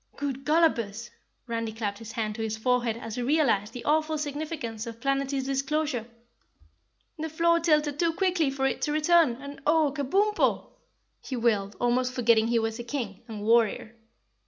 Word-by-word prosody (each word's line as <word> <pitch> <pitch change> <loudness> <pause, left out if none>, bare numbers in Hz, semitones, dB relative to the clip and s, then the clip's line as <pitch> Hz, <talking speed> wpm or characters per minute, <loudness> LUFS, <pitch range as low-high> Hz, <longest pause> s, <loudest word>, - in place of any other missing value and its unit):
"Good 275 -2 -4
Gollopers!" 240 -9 +1 0.3
Randy 230 -2 -3
clapped 210 -2 -4
his 225 -1 -9
hand 220 -3 -2
to 225 - -6
his 220 0 -2
forehead 240 0 +1
as 225 -1 -7
he - - -1
realized 240 -7 +2
the 240 0 -8
awful 310 +1 +1
significance 290 -6 -4
of 230 0 -8
Planetty's 275 +1 0
disclosure. 275 -2 -1 1.1
"The 320 +1 -3
floor 335 +2 +3
tilted 300 -3 +1
too 335 -1 +3
quickly 355 -4 +1
for 270 0 -2
it 270 - -1
to 295 - 0
return, 310 -3 +4
and 280 +2 -10
OH, 310 -2 +4
KABUMPO!" 390 +10 +1 0.5
he 265 - -5
wailed, 210 -4 0
almost 250 +1 +1
forgetting 230 -3 +3
he 235 0 +2
was 225 0 -1
a - - -4
King 235 -5 -5
and 215 -3 -7
Warrior. 225 0 +2
255 Hz, 165 wpm, -27 LUFS, 230-300 Hz, 1.1 s, return